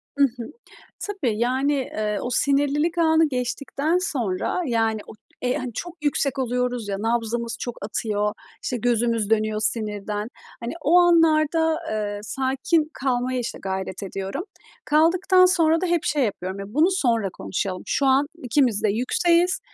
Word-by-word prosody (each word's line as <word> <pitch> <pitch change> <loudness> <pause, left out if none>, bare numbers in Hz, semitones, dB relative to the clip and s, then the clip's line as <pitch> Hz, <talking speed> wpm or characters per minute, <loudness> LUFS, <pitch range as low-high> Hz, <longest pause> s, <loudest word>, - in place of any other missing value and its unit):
I 285 - -1
hı, 245 -3 -1 0.5
tabii, 280 - -2
yani, 260 +4 +1
eee, 215 -6 -2
o - - -2
sinirlilik 290 +6 +1
anı 320 -1 +4
geçtikten 275 +5 -1
sonra, 245 - -1
yani, 225 -2 +1
o, - - -10 0.3
eee, 250 0 0
hani, 250 -2 -5
çok 350 +9 -6
yüksek 280 -1 0
oluyoruz 250 -3 -1
ya, 195 - -1
nabzımız 230 0 -1
çok 240 -2 -4
atıyor, 210 -1 -1 0.3
işte, 250 - -2
gözümüz 230 -2 0
dönüyor 215 -1 +1
sinirden. 210 -1 -2 0.3
Hani, 235 - -4
o 330 +4 +5
anlarda, 320 -2 +4
eee, 205 -1 -2
sakin 270 +7 0
kalmaya, 255 -1 -1
işte, 235 - -5
gayret 190 0 -4
ediyorum. 195 - -4 0.4
Kaldıktan 365 +5 +4
sonra 330 -3 +3
da 370 - 0
hep 345 -2 +1
şey 290 -3 +1
yapıyorum, 190 -3 -4
"Ya, 195 +2 -9
bunu 320 +6 +4
sonra 235 - +1
konuşalım. 185 -1 -4
Şu 280 - +1
an 270 +2 +4 0.2
ikimiz 245 -3 +2
de 215 - +3
yükseğiz. 340 - +2
250 Hz, 150 wpm, -23 LUFS, 215-310 Hz, 0.5 s, o